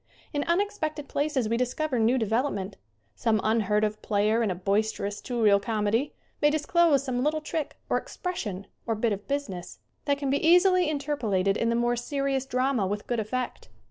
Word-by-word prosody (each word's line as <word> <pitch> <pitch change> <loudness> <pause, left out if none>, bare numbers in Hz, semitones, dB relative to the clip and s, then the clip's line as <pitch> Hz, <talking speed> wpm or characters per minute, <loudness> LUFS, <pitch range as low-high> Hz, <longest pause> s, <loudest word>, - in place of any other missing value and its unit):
In 290 -1 0
unexpected 340 -5 -1
places 285 -5 0
we 230 +1 0
discover 250 +2 -1
new 230 +4 +3
devel 225 +3 +1
opment. 200 -7 -3 0.4
Some 220 -2 +1
unheard 215 -1 +2
of 215 0 -1
player 215 +2 +1
in 220 - +1
a 185 - -1
boister 200 +3 0
ous 205 +1 -4
two 245 -2 -4
reel 200 -2 +6
comedy 220 +5 0 0.3
may 295 - +5
disclose 310 -1 +3
some 255 -2 -1
little 305 +2 +1
trick, 310 -1 -4
or - - +2
expression, 210 - -5 0.2
or 225 - +1
bit 220 0 +1
of 200 0 -7
business, 275 -11 -4 0.3
that 285 -1 +2
can 280 -2 -1
be 280 - 0
easily 360 +1 +5
interpolated 240 -11 0
in 230 - 0
the 235 - +1
more 240 +1 +2
serious 270 +1 -1
drama 255 -5 +1
with 205 +2 -3
good 240 -2 -1
effect. 245 - -4
245 Hz, 185 wpm, -27 LUFS, 215-290 Hz, 0.4 s, reel